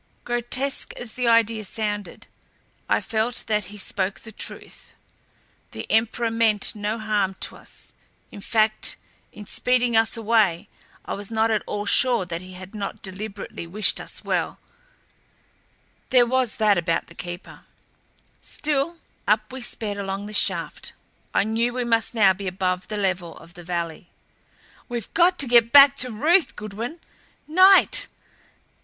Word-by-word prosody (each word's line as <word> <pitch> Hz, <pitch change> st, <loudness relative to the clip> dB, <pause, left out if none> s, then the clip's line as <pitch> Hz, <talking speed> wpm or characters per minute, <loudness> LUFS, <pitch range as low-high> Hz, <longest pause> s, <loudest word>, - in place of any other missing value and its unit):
Grotesque 245 Hz, +3 st, -1 dB
as 240 Hz, -2 st, -6 dB
the 250 Hz, +1 st, -2 dB
idea 230 Hz, -1 st, +3 dB
sounded, 205 Hz, -2 st, -4 dB, 0.6 s
I -, -, +2 dB
felt 225 Hz, +2 st, -1 dB
that 210 Hz, -2 st, 0 dB
he 205 Hz, +3 st, -10 dB
spoke 195 Hz, 0 st, -2 dB
the 220 Hz, -, -11 dB
truth. -, -, -8 dB, 0.8 s
The -, -, -6 dB
Emperor 225 Hz, +1 st, +1 dB
meant 225 Hz, -2 st, +2 dB
no 210 Hz, +1 st, -3 dB
harm 210 Hz, -3 st, -1 dB
to -, -, 0 dB
us; -, -, -11 dB, 0.4 s
in 200 Hz, -, -10 dB
fact 215 Hz, +1 st, +1 dB, 0.4 s
in 210 Hz, -, -11 dB
speeding 245 Hz, +2 st, +1 dB
us 225 Hz, +1 st, +3 dB
away 210 Hz, -5 st, +2 dB, 0.4 s
I -, -, -4 dB
was 200 Hz, 0 st, -6 dB
not 225 Hz, 0 st, +1 dB
at 215 Hz, -, +1 dB
all 205 Hz, 0 st, -3 dB
sure 240 Hz, -1 st, +3 dB
that 170 Hz, -1 st, -5 dB
he 185 Hz, 0 st, -11 dB
had 185 Hz, +2 st, -10 dB
not 210 Hz, 0 st, -6 dB
deliberately 195 Hz, -2 st, -7 dB
wished 205 Hz, +5 st, +1 dB
us -, -, -7 dB
well -, -, -2 dB, 1.5 s
there 250 Hz, -2 st, +5 dB
was 255 Hz, -1 st, 0 dB
that 210 Hz, -4 st, +3 dB
about 165 Hz, -1 st, -1 dB
the -, -, -16 dB
Keeper 175 Hz, +1 st, -9 dB, 0.7 s
Still 300 Hz, +3 st, -2 dB, 0.3 s
up 215 Hz, +3 st, +1 dB
we 260 Hz, -, -6 dB
sped 210 Hz, -4 st, -2 dB
along 195 Hz, 0 st, -4 dB
the 210 Hz, -, -8 dB
shaft. -, -, 0 dB, 0.4 s
I -, -, +2 dB
knew 230 Hz, +3 st, 0 dB
we 250 Hz, 0 st, -2 dB
must 230 Hz, 0 st, +1 dB
now 200 Hz, -4 st, +5 dB
be 195 Hz, +1 st, -7 dB
above 185 Hz, 0 st, -2 dB
the 210 Hz, -, -4 dB
level 185 Hz, -4 st, -2 dB
of 165 Hz, +1 st, -15 dB
the 175 Hz, -, -11 dB
valley. 170 Hz, -1 st, -4 dB, 0.8 s
"We've 240 Hz, -4 st, -5 dB
got 355 Hz, +1 st, +4 dB
to 280 Hz, -, +3 dB
get 235 Hz, -1 st, +5 dB
back 280 Hz, -1 st, +9 dB
to 250 Hz, -1 st, -1 dB
Ruth! 300 Hz, -, +2 dB
Goodwin 225 Hz, +10 st, -6 dB, 0.5 s
NIGHT! 375 Hz, +5 st, +6 dB
215 Hz, 150 wpm, -23 LUFS, 195-240 Hz, 1.5 s, back